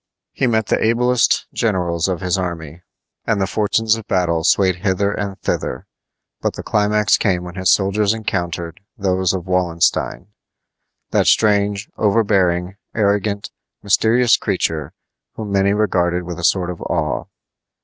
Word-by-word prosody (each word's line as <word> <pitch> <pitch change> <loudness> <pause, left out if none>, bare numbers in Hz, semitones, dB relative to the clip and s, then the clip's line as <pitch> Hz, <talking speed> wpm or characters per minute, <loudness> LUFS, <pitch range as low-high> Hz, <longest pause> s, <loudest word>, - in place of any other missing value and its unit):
He 130 - 0
met 110 -2 +1
the - - 0
ablest 120 +2 +2
generals 90 -6 0
of 90 -2 -2
his 90 -2 0
enemies, 85 -4 -5 0.5
and 110 -3 +1
the 95 - +1
fortunes 110 +3 +1
of 115 -2 -9
battle 85 -4 0
swayed 95 +1 +3
hither 95 +2 0
and 100 -2 -4
thither; 60 - -3 0.6
but - - -1
the - - -7
climax 105 0 +2
came 90 -3 0
when 90 0 -8
his 95 0 0
soldiers 100 +1 +2
encountered 85 -5 -3 0.2
those 95 -2 +1
of 90 -2 -4
Wallenstein 90 0 0 0.8
that - - +2
strange, 105 -1 +2
overbearing, 100 -4 +1 0.2
arrogant, 100 -1 0 0.3
mysterious 115 +4 +3
creature 80 -3 -2 0.4
whom 105 -2 -6
many 100 0 +2
regarded 90 -4 +1
with 90 -1 -7
a - - -7
sort 90 +1 +2
of 85 - -9
awe. 75 -5 -2
95 Hz, 140 wpm, -19 LUFS, 90-105 Hz, 0.8 s, swayed